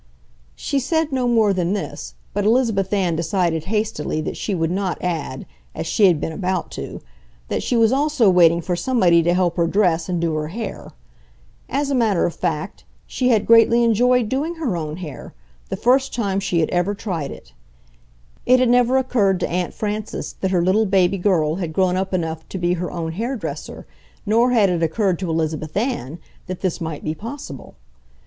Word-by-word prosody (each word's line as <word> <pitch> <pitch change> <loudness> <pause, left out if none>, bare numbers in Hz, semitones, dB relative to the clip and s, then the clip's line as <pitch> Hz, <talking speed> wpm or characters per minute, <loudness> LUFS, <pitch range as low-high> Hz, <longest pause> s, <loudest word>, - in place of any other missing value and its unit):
She 280 - -1
said 320 +3 0
no 255 -2 0
more 220 -4 +3
than 180 0 0
this, 205 - -5 0.2
but 205 - -1
Elizabeth 215 -4 +2
Ann 185 -5 +1
decided 165 -1 0
hastily 210 -7 -2
that - - -4
she 200 - -3
would 165 -1 0
not 190 -1 -1
add, 160 -7 -3 0.3
as - - -4
she 205 - +4
had 170 -5 +3
been 165 - -3
about 185 +1 -2
to, - - -7 0.5
that - - -1
she 245 - 0
was 225 -1 +4
also 285 -3 +2
waiting 170 -2 +5
for 175 +1 -2
somebody 180 -6 +3
to 175 +2 +2
help 180 -2 +1
her 170 -1 +2
dress 175 -3 +1
and 175 -1 -1
do 165 -1 0
her 155 0 -2
hair. 205 +4 -6 0.8
As 280 +1 -1
a - - +1
matter 225 -8 +2
of 170 - -2
fact, 170 +2 -3 0.2
she 255 -1 -1
had 220 -4 +3
greatly 230 +1 +5
enjoyed 240 +1 +3
doing 290 +8 -2
her 290 - -2
own 155 -2 -4
hair—the - - -9
first 265 +2 +2
time 200 -5 0
she 185 -4 0
had 155 - 0
ever 180 +3 0
tried 175 -9 -4
it. 65 - -12 0.9
It 255 +1 +6
had 255 -1 +3
never 245 +1 +4
occurred 215 -8 +1
to - - -1
Aunt 180 0 -1
Frances 215 0 -4
that 190 - +1
her 180 -2 +1
little 205 +4 +2
baby 190 0 +2
girl 170 -4 +1
had 170 -4 -4
grown 185 +1 +2
up 190 +1 -2
enough 165 -3 -3
to - - -5
be 175 -1 +1
her 180 0 -3
own 165 -2 -4
hairdresser, 235 +8 -5 0.4
nor 230 +4 +3
had 225 -5 +4
it 175 -2 -1
occurred 175 +2 0
to 185 -3 -3
Elizabeth 155 0 -2
Ann 200 - -2 0.3
that 185 -1 -6
this 185 -1 -2
might 160 -2 -5
be 155 - -2
possible. 215 - -8
190 Hz, 190 wpm, -21 LUFS, 170-230 Hz, 0.9 s, It